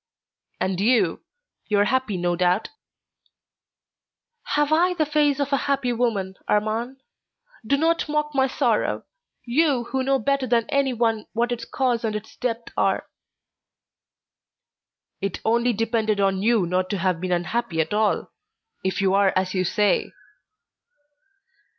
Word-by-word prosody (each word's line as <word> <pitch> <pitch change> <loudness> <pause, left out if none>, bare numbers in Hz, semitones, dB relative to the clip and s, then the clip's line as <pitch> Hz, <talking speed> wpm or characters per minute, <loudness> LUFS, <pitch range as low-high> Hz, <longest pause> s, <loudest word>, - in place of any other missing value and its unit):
"And 185 -1 -1
you. 235 +3 +2 0.5
You 210 - +1
are 200 - +5
happy, 260 -4 0
no 175 0 0
doubt?" 180 +3 +1 1.9
"Have 295 +1 +2
I 355 +3 +3
the 315 -3 +1
face 295 -2 +2
of 285 0 -1
a - - +4
happy 270 -3 +1
woman, 205 -6 -1
Armand? 225 +5 -1 0.6
Do 280 +6 +1
not 325 +1 +1
mock 300 0 -1
my 265 -1 +3
sorrow, - - 0 0.4
you, 270 0 +2
who 265 - 0
know 270 +1 +2
better 275 +2 0
than 230 -1 +2
anyone 240 -5 0
what 235 +2 0
its 235 -1 -3
cause 245 -2 0
and 220 -2 -1
its 210 - -7
depth 235 -1 -4
are." - - +1 2.2
"It 195 -2 -3
only 235 +2 +2
depended 220 -1 0
on 195 -1 +1
you 220 -3 +3
not 185 +1 -1
to 205 - -1
have 180 -2 0
been 185 0 -2
unhappy 175 +1 -1
at 160 +6 0
all, 215 0 +1 0.5
if 190 +1 -1
you 190 -1 +2
are 200 -1 +4
as 185 0 0
you 185 -1 +1
say." 205 +3 +1
230 Hz, 145 wpm, -23 LUFS, 195-265 Hz, 2.2 s, are